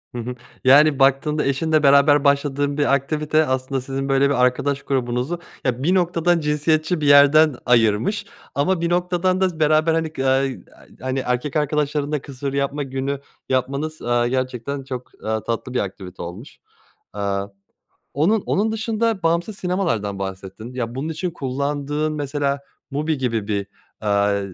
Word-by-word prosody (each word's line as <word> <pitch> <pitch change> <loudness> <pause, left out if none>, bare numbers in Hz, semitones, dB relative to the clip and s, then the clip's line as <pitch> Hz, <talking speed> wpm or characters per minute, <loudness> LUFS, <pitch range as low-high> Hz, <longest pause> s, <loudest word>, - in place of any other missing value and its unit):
Hı 120 - -3
hı, 125 +2 -5 0.3
yani, 140 +2 +6
baktığında 140 +3 +3
eşinle 155 +3 +1
beraber 140 +1 +5
başladığın 140 0 +1
bir 145 -1 +2
aktivite 150 +3 +1
aslında 130 0 -1
sizin 135 +1 -4
böyle 135 +1 +3
bir 125 -3 +2
arkadaş 135 +2 +1
grubunuzu 130 +5 -1 0.3
ya 125 0 -1
bir 180 +5 +3
noktadan 175 -1 +2
cinsiyetçi 155 +2 0
bir 145 - +1
yerden 145 +1 +6
ayırmış 115 - +2 0.3
ama 170 +5 +1
bir 170 - 0
noktadan 180 +1 +1
da 180 -4 0
beraber 155 +1 +3
hani, 165 0 0
ga 135 -3 -3
a 135 - +3 0.6
hani, 130 +1 -2
erkek 125 +2 -2
arkadaşların 150 -1 0
da 150 -3 -1
kısır 140 0 -5
yapma 140 +1 -1
günü 135 +1 -3 0.3
yapmanız, 140 +5 -1
eee, 120 0 +1
gerçekten 130 +1 -3
çok, 125 -2 -7
eee, 110 0 -1
tatlı 120 +2 -3
bir 125 - +1
aktivite 95 -2 -6
olmuş. 90 +10 -8 0.6
Aaa, 100 -1 -2 0.7
onun 190 +10 +2
onun 215 +3 +1
dışında 225 -1 -1
bağımsız 170 +5 0
sinemalardan 165 - -1
bahsettin 95 +4 -7
ya 120 -2 -3
bunun 135 +4 -3
için 160 +3 -3
kullandığın 145 +2 -2
mesela 140 -1 -1 0.3
MUBI 150 +1 -1
gibi 115 -5 -2
bir, 100 -2 -1 0.3
aaa, 100 -1 +1
140 Hz, 150 wpm, -21 LUFS, 125-155 Hz, 0.7 s, yani